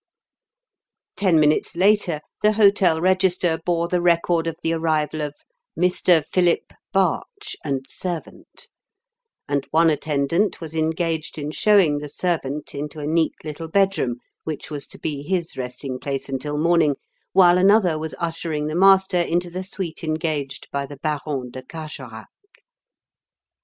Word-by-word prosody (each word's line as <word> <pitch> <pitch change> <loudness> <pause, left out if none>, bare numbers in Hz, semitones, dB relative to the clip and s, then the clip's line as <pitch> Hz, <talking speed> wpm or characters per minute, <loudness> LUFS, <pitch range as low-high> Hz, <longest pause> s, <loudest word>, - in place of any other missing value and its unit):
Ten 185 -5 +3
minutes 150 +2 +2
later 185 -4 +2 0.2
the 210 0 +4
hotel 200 -6 +4
register 180 -2 +2
bore 170 -1 0
the 180 0 0
record 170 -1 +2
of 165 - -2
the 165 - +1
arrival 155 -1 0
of 150 -1 -4 0.4
"Mr. 180 -3 +3
Philip 175 +1 +1 0.2
Barch 420 - -1
and 135 -1 -2
servant"; 175 -3 -6 0.8
and 140 -1 -1
one 165 +1 +4
attendant 155 +6 0
was 160 -2 -7
engaged 160 0 -1
in 150 0 -4
showing 180 -6 +4
the 150 0 -7
servant 150 -3 -2
into 145 +2 -5
a 145 - -4
neat 160 +1 +1
little 155 +1 -6
bedroom 190 -9 +1 0.3
which 155 0 -6
was 145 -2 -4
to - - -11
be 145 -3 -4
his 170 +2 -2
resting 125 +1 -5
place 135 0 -3
until 135 +2 -3
morning 160 -2 +3 0.4
while 180 -1 +6
another 190 -4 +4
was 160 0 -5
ushering 165 -2 -3
the 155 - -3
master 190 0 +5
into 175 +1 -1
the 185 +2 -4
suite 185 -4 -5
engaged 155 -3 -2
by 140 0 -2
the 145 0 -10
Baron 145 -4 -3
de 130 - -7
Carjorac. 130 -6 -8
160 Hz, 140 wpm, -22 LUFS, 150-180 Hz, 0.8 s, while